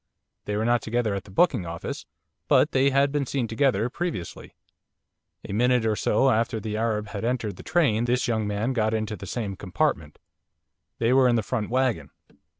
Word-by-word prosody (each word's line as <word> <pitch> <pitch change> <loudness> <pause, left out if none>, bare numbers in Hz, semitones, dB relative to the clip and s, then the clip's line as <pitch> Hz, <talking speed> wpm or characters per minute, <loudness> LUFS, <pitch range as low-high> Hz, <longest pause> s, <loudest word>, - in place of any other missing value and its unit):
They 105 - -2
were 110 - 0
not 120 0 +2
together 115 -1 -1
at 100 -1 -4
the - - -14
booking 110 - +2
office, 85 0 -6 0.4
but - - +4
they 135 +1 +3
had 140 +1 +2
been 145 -2 -1
seen 130 -3 -1
together 115 -1 +1
previously. 140 - -5 0.9
A - - -5
minute 125 +2 +2
or 110 -1 +1
so 135 +5 +2
after 115 0 0
the 105 0 -4
Arab 110 -1 -1
had 100 0 -5
entered 115 -3 -1
the - - -11
train 130 -10 +1
this 125 +1 +1
young 110 -3 0
man 105 +5 -1
got 110 -2 +1
into 110 -1 -2
the 100 - -9
same 105 -4 -3
compartment 90 - -2 0.8
they 115 +2 +2
were 130 -1 +5
in 120 - +3
the 115 - +1
front 110 -2 -3
waggon. 120 - 0
115 Hz, 190 wpm, -25 LUFS, 105-125 Hz, 0.9 s, were